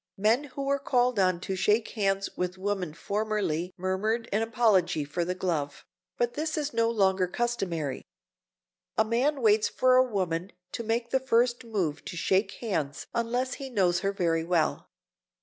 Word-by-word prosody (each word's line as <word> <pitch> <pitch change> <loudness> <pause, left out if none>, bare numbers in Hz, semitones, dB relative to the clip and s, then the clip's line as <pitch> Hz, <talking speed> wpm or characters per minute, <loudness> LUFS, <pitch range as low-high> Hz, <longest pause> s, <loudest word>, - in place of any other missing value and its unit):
Men 225 +8 +2
who 275 0 -6
were 280 0 +1
called 250 -4 +1
on 185 -2 +3
to 190 - -3
shake 210 +4 +2
hands 195 -2 0
with 180 +1 -2
women 190 -3 -2
formerly 200 -5 -1
murmured 210 +6 -1
an 210 - +2
apology 220 -9 +2
for 150 +5 -2
the 180 +2 -2
glove, 160 -6 -2 0.3
but 240 0 0
this 310 +1 -2
is 295 -1 -2
no 230 0 +2
longer 190 -4 +2
customary. 180 - -2 0.9
A 220 - +4
man 255 +5 +1
waits 215 -1 +4
for 255 0 +4
a 255 - +7
woman 180 -2 -2 0.2
to - - -4
make 230 +1 -1
the 265 - +3
first 245 -1 +2
move 185 -10 -2
to 175 - -6
shake 190 +3 +1
hands 150 - -3
unless 245 +2 -1
he 270 - -5
knows 185 -7 +2
her 195 0 0
very 170 -4 0
well. 165 -2 0
205 Hz, 165 wpm, -28 LUFS, 180-235 Hz, 0.9 s, a